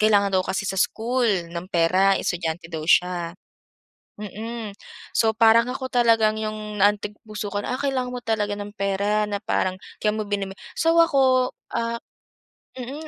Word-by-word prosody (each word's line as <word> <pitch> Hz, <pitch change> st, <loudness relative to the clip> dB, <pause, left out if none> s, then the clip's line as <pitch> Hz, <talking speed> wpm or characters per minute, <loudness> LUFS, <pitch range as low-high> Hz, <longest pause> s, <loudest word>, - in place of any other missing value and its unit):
kailangan 205 Hz, -2 st, +4 dB
daw 190 Hz, -, +4 dB
kasi 190 Hz, +2 st, -2 dB
sa 195 Hz, -1 st, -1 dB
school 240 Hz, +4 st, +1 dB, 0.2 s
ng 170 Hz, +1 st, -6 dB
pera 185 Hz, +3 st, +4 dB
estudyante 165 Hz, -1 st, -3 dB
daw 160 Hz, -, -3 dB
siya 175 Hz, -1 st, +2 dB, 0.8 s
mm, 215 Hz, +2 st, -6 dB, 0.4 s
so 220 Hz, -1 st, +2 dB
parang 230 Hz, +2 st, +5 dB
ako 260 Hz, +1 st, -4 dB
talagang 225 Hz, -3 st, +3 dB
'yung 215 Hz, -1 st, -5 dB
naantig 205 Hz, +1 st, +2 dB
puso 210 Hz, -1 st, -5 dB
ko 205 Hz, -, -1 dB
na, 245 Hz, -, -2 dB
"Ah, -, -, -6 dB
kailangan 255 Hz, -3 st, -1 dB
mo 245 Hz, -, -6 dB
talaga 210 Hz, -3 st, 0 dB
ng 205 Hz, 0 st, -7 dB
pera 205 Hz, +1 st, 0 dB
na 205 Hz, 0 st, -4 dB
parang 185 Hz, -4 st, 0 dB, 0.2 s
kaya 210 Hz, 0 st, +1 dB
mo 215 Hz, -, -2 dB
binebe" 200 Hz, -2 st, -3 dB, 0.2 s
so 330 Hz, 0 st, +2 dB
ako, 260 Hz, -4 st, +3 dB, 0.2 s
ah, 230 Hz, 0 st, -1 dB, 0.8 s
mm, 270 Hz, +5 st, -7 dB
210 Hz, 160 wpm, -24 LUFS, 195-235 Hz, 0.8 s, parang